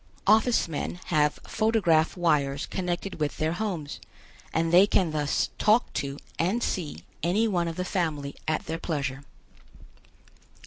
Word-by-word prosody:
Office 220 +2 +4
men 165 +2 -4
have 150 -1 +3
photograph 195 -8 +2
wires 145 -5 +1
connected 180 0 -3
with 150 -1 -1
their 155 +1 0
homes, 175 -7 -4 0.5
and 165 +1 0
they 185 +3 +8
can 185 -5 +2
thus 150 -2 0
talk 215 +4 +3
to 140 0 -3 0.2
and 195 +8 +1
see 150 - -3 0.2
any 195 +8 +2
one 175 -5 0
of 165 - -4
the 180 - -3
family 155 -7 -2
at 155 0 0
their 165 +1 -4
pleasure. 140 -5 -3
165 Hz, 140 wpm, -27 LUFS, 150-190 Hz, 0.5 s, they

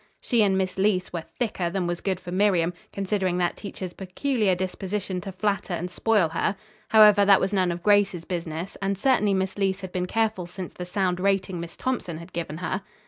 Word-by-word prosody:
She 240 -3 +2
and 195 -2 +3
Miss 185 -1 -1
Leece 190 -2 +1
were 165 -2 -4
"thicker" 205 -8 -1
than 185 0 -1
was 175 0 -2
good 190 -2 -1
for 175 -1 -8
Miriam, 180 -3 +2 0.2
considering 195 -2 -1
that 175 -1 +1
teacher's 190 -3 -7
peculiar 200 +1 0
disposition 190 +1 -3
to 195 - -6
flatter 200 -2 -1
and 180 +2 -4
spoil 205 -3 +2
her. 175 +5 0 0.3
However, 210 -2 +7
that 200 -1 +6
was 195 +2 -1
none 185 -3 +2
of 170 0 -5
Grace's 205 -5 +3
business, 170 0 -4
and 195 0 0
certainly 210 -3 +3
Miss 190 0 -1
Leece 195 0 0
had 190 -1 -7
been 180 0 -2
careful 220 -4 0
since 180 +1 -7
the 180 - -6
sound 180 -1 0
rating 190 -2 0
Miss 170 0 -7
Thompson 250 -10 -2
had 170 +2 -11
given 165 -2 -4
her. 190 - -2
190 Hz, 200 wpm, -25 LUFS, 180-205 Hz, 0.3 s, However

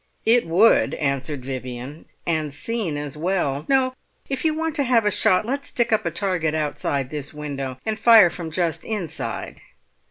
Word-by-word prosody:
"It 230 -3 +4
would," 190 +8 +4
answered 140 -1 -2
Vivian, 130 +2 -6 0.2
"and 155 -3 -1
seen 170 +2 -1
as 145 -1 -5
well. 150 -4 -1
No, 260 -1 +3 0.4
if 270 - -2
you 320 - +3
want 325 -1 -2
to 285 - +2
have 240 -4 +3
a 210 - +3
shot 185 +1 +3
let's 275 +4 -3
stick 240 -2 0
up 215 -4 +1
a - - +2
target 170 -3 -1
outside 145 -3 -2
this 150 -1 -5
window, 140 -3 -5
and 220 0 -2
fire 220 -7 +7
from 170 -3 -6
just 165 -1 -1
inside." 205 -8 -4
165 Hz, 170 wpm, -23 LUFS, 145-225 Hz, 0.4 s, fire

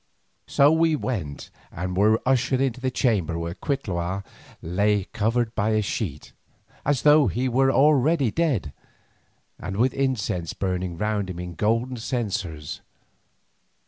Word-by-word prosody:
So 140 +2 +5
we 160 0 +3
went 95 - -4 0.2
and 90 +1 -4
were 105 +4 +4
ushered 130 0 +2
into 130 -1 -1
a - - +3
chamber 105 - 0
where 85 0 -3
Cuitlahua 95 - -3 0.4
lay 100 +4 +1
covered 115 +2 0
by 110 0 0
a 110 0 +2
sheet, 90 - -4 0.5
as 145 -4 0
though 150 -2 +6
he 120 +7 -1
were 135 +2 +3
already 145 -2 +3
dead, 130 - 0 0.9
and 95 +2 -5
with 125 +4 +2
incense 105 - -1
burning 90 -2 -3
round 105 -1 -1
him 90 - -6
in 90 0 -6
golden 115 +7 0
censers. 100 - -4
110 Hz, 135 wpm, -24 LUFS, 90-130 Hz, 0.9 s, though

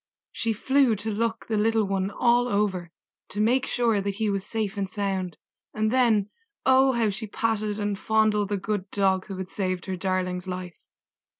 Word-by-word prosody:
She 230 - -1
flew 265 +2 +3
to 215 +2 -3
look 225 +2 -1
the 220 - -1
little 220 0 +2
one 195 0 -1
all 240 +3 +3
over, 200 -6 0 0.4
to 205 - -5
make 250 +5 +2
sure 230 -4 +1
that 200 0 -2
he 215 0 0
was 195 -1 -1
safe 215 -2 -3
and 195 -2 -2
sound, 195 -4 -2 0.4
and 215 0 +1
then, 230 -5 +3 0.3
oh! 265 0 +5
how 230 -3 +2
she 215 +3 -5
patted 215 -1 -1
and 205 -2 -2
fondled 215 -2 +2
the 205 - 0
good 195 0 -3
Dog 190 -2 +1
who 195 -2 -6
had 190 -1 -4
saved 185 -2 -2
her 190 - -3
darling's 185 -1 -2
life! 180 -1 -5
205 Hz, 185 wpm, -26 LUFS, 190-225 Hz, 0.4 s, oh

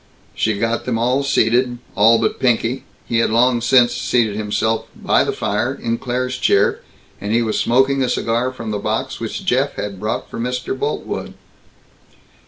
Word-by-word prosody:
She 110 -1 0
got 115 +2 -1
them 125 -2 -1
all 125 +4 +1
seated 125 -2 +2 0.2
all 115 +2 +5
but 110 -1 -1
Pinky. 125 0 0 0.2
He 115 - 0
had 115 - +2
long 120 +2 +3
since 120 0 +4
seated 110 -4 +1
himself, 110 +1 -1
by - - +2
the - - -1
fire, - - -1
in 115 0 -3
Claire's 125 0 -2
chair, - - +3 0.4
and 100 +1 -3
he 115 +1 +3
was 110 -2 -1
smoking 135 +3 +2
a 130 - +1
cigar 120 +3 0
from 115 -4 -6
the 105 - -2
box - - -2
which - - -5
Jeff - - +1
had 100 -2 -5
brought 110 +2 -3
for - - -8
Mr. 125 - -2
Boltwood. 430 +2 -4
115 Hz, 175 wpm, -19 LUFS, 110-125 Hz, 0.4 s, all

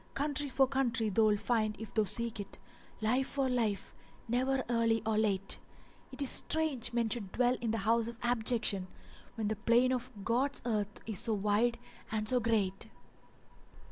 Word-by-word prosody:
Country 290 0 -1
for 270 0 +4
country 240 -5 0
thou'lt 215 0 +3
find, 215 -3 0
if 220 -2 -8
thou 215 -1 +2
seek 225 +2 -2
it; 200 - -7 0.2
* - - -26
Life 250 +5 +1
for 275 -1 -1
life 225 -6 -1 0.3
never, 260 +3 +1
early 230 -1 +1
or 220 -1 +1
late. 200 -3 0 0.5
It 285 - -2
is 270 - 0
strange 305 -7 +1
men 235 -1 +1
should 215 -4 -2
dwell 250 0 +2
in 235 - -1
the 225 - 0
house 225 +2 +1
of 235 -1 -7
abjection, 225 -5 +2 0.2
* - - -22
When 220 -3 -2
the 215 - 0
plain 235 +4 +3
of 255 0 -2 0.2
God's 255 +5 0
earth 210 -3 -2
is 220 -4 0
so 225 -2 0
wide 210 +4 +1 0.3
and 215 -1 -1
so 250 +2 +3
great!" 215 -4 0
230 Hz, 175 wpm, -32 LUFS, 215-250 Hz, 0.5 s, for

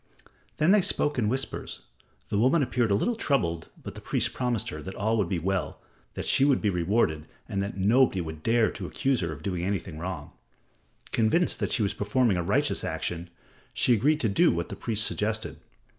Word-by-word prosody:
Then 155 +4 +4
they 210 0 +6
spoke 145 -5 +1
in 105 -3 +1
whispers. 135 +3 -3 0.5
The 100 - 0
woman 135 +7 +4
appeared 120 -3 0
a 100 - +3
little 240 - +1
troubled, 85 - -1 0.2
but - - -7
the - - -10
priest - - 0
promised 125 -4 -1
her 75 - -6
that 95 +5 -7
all 110 +3 0
would 100 -5 0
be 95 - 0
well, 90 -2 -2 0.4
that - - -4
she - - +4
would 140 -2 +4
be 105 - +1
rewarded, 85 -3 0 0.2
and 100 - -2
that 100 0 -4
nobody 110 +2 +3
would 80 -2 -6
dare 115 +4 +2
to 95 - -6
accuse 135 +4 0
her 85 -3 -2
of 75 - -9
doing 90 -3 -2
anything 90 -4 -3
wrong. 85 -4 -5 0.8
Convinced 115 +11 +2
that - - -1
she 110 - +4
was 100 0 0
performing 105 +1 +1
a - - 0
righteous 85 - 0
action, 85 0 -3 0.5
she 125 - +3
agreed 145 +8 +2
to 115 - +2
do 100 - +4
what 85 0 -3
the - - -5
priest 110 -2 0
suggested. 110 +2 -2
105 Hz, 205 wpm, -27 LUFS, 90-125 Hz, 0.8 s, they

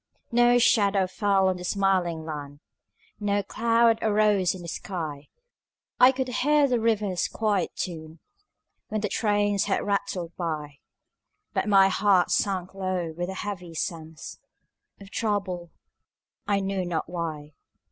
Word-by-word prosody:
No 240 +1 +5
shadow 200 -5 +3
fell 195 0 +1
on 185 -1 0
the 180 - -8
smiling 180 -4 0
land, 145 -2 -7 0.6
No 205 -1 0
cloud 230 0 +2
arose 210 -4 +2
in 180 - -9
the - - -8
sky; 160 -5 -5 0.7
I 250 +1 +8
could 260 0 -3
hear 290 +3 +3
the 245 -3 +1
river's 210 -5 0
quiet 210 -5 -1
tune 160 -3 -6 0.7
When 215 -1 -2
the 210 - -1
trains 205 -1 +1
had 200 - -1
rattled 185 -4 -2
by; 150 -5 -4 0.7
But 210 - -1
my 195 -1 +6
heart 190 -2 +3
sank 190 -2 0
low 185 -4 -3
with 175 +2 -3
a 190 - -5
heavy 180 -5 -6
sense 160 -1 -5 0.6
Of 200 -1 -13
trouble, 190 -6 -2 0.8
I 200 -1 +1
knew 195 -1 -2
not 175 -2 -2
why. 160 -4 -5
195 Hz, 135 wpm, -26 LUFS, 175-210 Hz, 0.8 s, I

